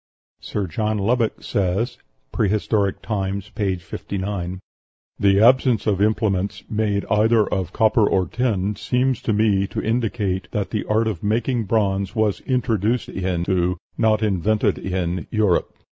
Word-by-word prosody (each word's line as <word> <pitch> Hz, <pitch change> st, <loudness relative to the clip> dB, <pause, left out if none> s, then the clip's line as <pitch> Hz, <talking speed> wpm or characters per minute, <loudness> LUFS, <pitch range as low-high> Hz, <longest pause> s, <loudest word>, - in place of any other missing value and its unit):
Sir 105 Hz, -, -3 dB
John 105 Hz, +5 st, -1 dB
Lubbock 115 Hz, +3 st, 0 dB
says 100 Hz, +6 st, -1 dB, 0.3 s
("Prehistoric 105 Hz, -1 st, 0 dB
Times," 100 Hz, -1 st, -3 dB
p. 100 Hz, -4 st, -1 dB
59), 95 Hz, 0 st, -5 dB, 0.6 s
"The 100 Hz, 0 st, +4 dB
absence 125 Hz, -1 st, +4 dB
of 100 Hz, -3 st, +1 dB
implements 100 Hz, -3 st, 0 dB
made 105 Hz, -2 st, -1 dB
either 110 Hz, +1 st, +3 dB
of 95 Hz, -3 st, -2 dB
copper 110 Hz, 0 st, +3 dB
or 95 Hz, -1 st, +2 dB
tin 105 Hz, -1 st, -1 dB
seems 125 Hz, +4 st, 0 dB
to -, -, -1 dB
me 105 Hz, -2 st, +2 dB
to -, -, -4 dB
indicate 105 Hz, -5 st, -1 dB
that 105 Hz, -2 st, -2 dB
the 105 Hz, -, -2 dB
art 110 Hz, +1 st, +1 dB
of 105 Hz, -7 st, -3 dB
making 115 Hz, +2 st, 0 dB
bronze 100 Hz, -1 st, 0 dB
was 110 Hz, -3 st, +1 dB
introduced 115 Hz, -2 st, 0 dB
into, 90 Hz, 0 st, -1 dB, 0.2 s
not 110 Hz, -1 st, +2 dB
invented 105 Hz, +1 st, +1 dB
in, 90 Hz, -3 st, -2 dB
Europe." 105 Hz, -5 st, +1 dB
105 Hz, 135 wpm, -22 LUFS, 95-110 Hz, 0.6 s, The